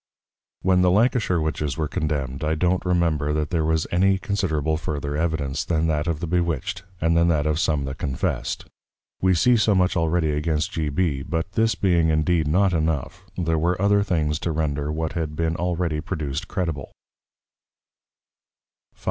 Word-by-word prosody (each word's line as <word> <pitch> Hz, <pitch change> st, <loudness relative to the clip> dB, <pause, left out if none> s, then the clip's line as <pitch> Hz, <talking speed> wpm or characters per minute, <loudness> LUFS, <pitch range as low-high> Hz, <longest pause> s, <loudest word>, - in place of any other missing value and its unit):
When 90 Hz, 0 st, +4 dB
the 90 Hz, -, +4 dB
Lancashire 105 Hz, -2 st, +2 dB
Witches 75 Hz, -3 st, -2 dB
were 80 Hz, -1 st, -1 dB
Condemn'd 70 Hz, -2 st, -2 dB
I 75 Hz, +1 st, +1 dB
don't 90 Hz, +3 st, +1 dB
remember 85 Hz, -5 st, +1 dB
that 75 Hz, +2 st, -1 dB
there 85 Hz, -3 st, +1 dB
was 80 Hz, 0 st, +1 dB
any 95 Hz, +2 st, +3 dB
considerable 80 Hz, -6 st, -1 dB
further 75 Hz, -2 st, -3 dB
Evidence, 75 Hz, -3 st, -1 dB
than 80 Hz, -1 st, 0 dB
that 75 Hz, +1 st, 0 dB
of 85 Hz, -2 st, -1 dB
the -, -, -1 dB
Bewitched, 85 Hz, -2 st, -1 dB, 0.2 s
and 80 Hz, 0 st, +2 dB
than 85 Hz, 0 st, +4 dB
that 80 Hz, -3 st, +2 dB
of 75 Hz, 0 st, +1 dB
some 75 Hz, -5 st, +1 dB
that 70 Hz, +1 st, -6 dB
confessed. 65 Hz, -3 st, -2 dB, 0.6 s
We 95 Hz, -1 st, +3 dB
see 125 Hz, +9 st, +4 dB
so 105 Hz, -1 st, +3 dB
much 90 Hz, 0 st, +2 dB
already 80 Hz, -1 st, +1 dB
against 75 Hz, +1 st, -1 dB
G. 80 Hz, -3 st, -2 dB
B. 70 Hz, -2 st, 0 dB
But 80 Hz, +3 st, -3 dB
this 110 Hz, 0 st, +2 dB
being 85 Hz, -4 st, +2 dB
indeed 80 Hz, 0 st, +2 dB
not 95 Hz, +4 st, +3 dB
enough, 80 Hz, -4 st, -1 dB, 0.2 s
there 80 Hz, -3 st, 0 dB
were 85 Hz, +3 st, 0 dB
other 100 Hz, +1 st, +3 dB
things 80 Hz, -6 st, 0 dB
to 85 Hz, -, -2 dB
render 75 Hz, -2 st, -1 dB
what 80 Hz, 0 st, -2 dB
had 80 Hz, -3 st, -3 dB
been 80 Hz, +1 st, 0 dB
already 85 Hz, -3 st, -1 dB
produced 75 Hz, 0 st, -4 dB
credible. 85 Hz, -7 st, -3 dB, 2.0 s
V. -, -, -31 dB
80 Hz, 175 wpm, -23 LUFS, 75-90 Hz, 2.0 s, When